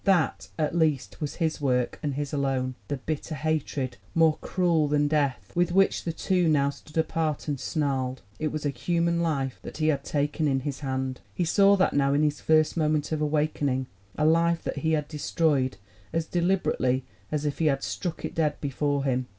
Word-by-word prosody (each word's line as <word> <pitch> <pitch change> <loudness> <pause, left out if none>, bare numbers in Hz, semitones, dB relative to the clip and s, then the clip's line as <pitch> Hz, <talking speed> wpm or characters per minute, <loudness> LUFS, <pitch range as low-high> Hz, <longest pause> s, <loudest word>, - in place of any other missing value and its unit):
That, 190 -5 +2
at 155 -1 0
least, 155 -5 0
was 150 - -3
his 160 -3 -1
work, 125 -3 0
and 145 -4 -2
his 145 0 -3
alone 135 -2 0
the 145 - -2
bitter 155 +3 -4
hatred, 145 -6 -2 0.2
more 160 -2 +4
cruel 170 -4 +2
than 145 0 +2
death, 140 -10 0
with 175 0 +2
which 195 +2 +3
the 170 - 0
two 180 +1 +1
now 140 -3 +3
stood 150 +2 -12
apart 160 -2 0
and 145 -3 -1
snarled. 130 -4 -1 0.2
It 155 - 0
was 155 -1 -4
a 145 - +1
human 170 +5 0
life 140 -6 -1
that - - -8
he 155 0 +2
had 140 -3 0
taken 145 +1 0
in 135 -2 +1
his 140 0 -4
hand 130 -2 -3
he 175 - 0
saw 200 +4 +5
that 190 -1 +2
now 140 0 +3
in 150 - +3
his 150 -3 0
first 155 -1 +3
moment 155 -2 +1
of 155 -1 -1
awakening 150 -3 0 0.3
a 150 - +2
life 165 +1 +3
that - - -3
he 160 0 +1
had 150 -2 0
destroyed 150 -5 0 0.3
as 165 -1 0
deliberately 170 -8 +1 0.3
as 150 -1 -1
if 145 - -2
he 160 - +3
had 135 -2 +1
struck 175 -3 -3
it - - -5
dead 150 -2 0
before 145 0 -1
him. 130 -2 0
150 Hz, 200 wpm, -27 LUFS, 140-160 Hz, 0.3 s, saw